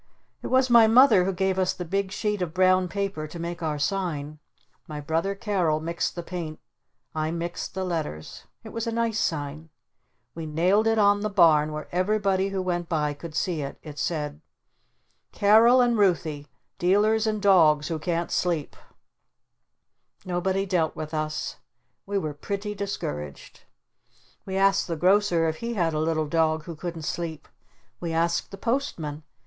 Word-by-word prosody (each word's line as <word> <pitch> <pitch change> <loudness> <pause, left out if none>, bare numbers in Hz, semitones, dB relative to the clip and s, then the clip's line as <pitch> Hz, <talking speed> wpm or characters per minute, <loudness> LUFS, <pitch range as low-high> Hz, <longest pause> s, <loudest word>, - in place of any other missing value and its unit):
It - - -5
was 260 0 +3
my 230 -2 +8
Mother 225 -5 +6
who 195 - +1
gave 190 0 0
us 185 -1 +1
the 180 - -6
big 195 +2 -1
sheet 210 0 -2
of 165 -3 -3
brown 185 0 +4
paper 190 -4 -3
to 160 - -9
make 170 0 -5
our 155 -2 -1
sign. 155 -4 -2 0.5
My 150 -1 -6
brother 165 +6 -1
Carol 185 -7 0
mixed 170 +2 -2
the 175 - -5
paint. 165 -3 -6 0.5
I 155 0 -1
mixed 170 +2 -4
the 190 - -2
letters. 160 - -4 0.2
It - - -9
was 230 +1 -4
a - - 0
nice 230 -1 0
sign. 155 -1 -3 0.6
We 165 -1 -6
nailed 180 +8 +2
it 225 0 +2
on 205 -1 +4
the 215 - -1
barn 160 -6 +4
where 150 0 -6
everybody 195 +1 +1
who 195 -1 -2
went 175 -2 -2
by 150 -3 0
could 155 +2 -9
see 170 -3 -1
it. 140 0 -6
It 150 -2 -9
said: 150 -2 -3 0.9
"Carol 225 +5 +5
and 240 -1 +3
Ruthy. 165 -8 +1 0.3
Dealers 210 +5 +3
in 215 -1 0
Dogs 160 -7 +4
who 160 -2 -2
Can't 170 +1 -2
Sleep." 170 -5 -1 1.5
Nobody 185 +2 -1
dealt 175 -5 0
with 155 0 -6
us. 155 -1 -3 0.5
We 200 0 -1
were 155 -6 -2
pretty 200 +7 -4
discouraged. 75 - -6 0.8
We 190 0 -2
asked 195 0 +3
the 170 - -2
Grocer 180 -1 +3
if 160 0 -2
he 235 +4 -4
had 170 -5 +1
a 155 - -1
little 155 0 0
dog 160 0 +1
who 165 +1 -7
couldn't 165 0 -6
sleep. 160 -1 -4 0.5
We 170 -1 -3
asked 170 +1 0
the 195 - -9
Postman. 185 - -2
175 Hz, 165 wpm, -26 LUFS, 155-200 Hz, 1.5 s, my